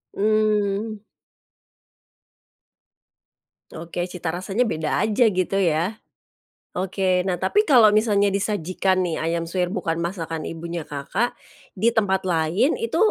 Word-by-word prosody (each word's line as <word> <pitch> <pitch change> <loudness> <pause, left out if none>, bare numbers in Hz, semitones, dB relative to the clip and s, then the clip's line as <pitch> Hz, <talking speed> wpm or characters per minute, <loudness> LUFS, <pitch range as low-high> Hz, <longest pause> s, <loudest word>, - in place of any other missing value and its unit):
Mmm. 215 0 +1 2.7
Oke, 170 +2 -5
cita 175 -3 -4
rasanya 190 +7 -1
beda 155 -8 -1
aja 220 +2 +3
gitu 185 -1 -1
ya. 175 +5 0 0.8
Oke, 185 0 +1
nah 180 - 0
tapi 420 +1 +2
kalo 240 -7 +7
misalnya 205 -2 +3
disajikan 190 -2 0
nih 170 -2 -2
ayam 165 +1 -1
suwir 180 0 -1
bukan 170 -5 -2
masakan 165 -3 -4
ibunya 170 0 -5
Kakak 145 +12 -2 0.4
di 220 +5 +2
tempat 190 -3 +1
lain 170 - +1
itu, 460 - -2
185 Hz, 115 wpm, -23 LUFS, 170-215 Hz, 2.7 s, kalo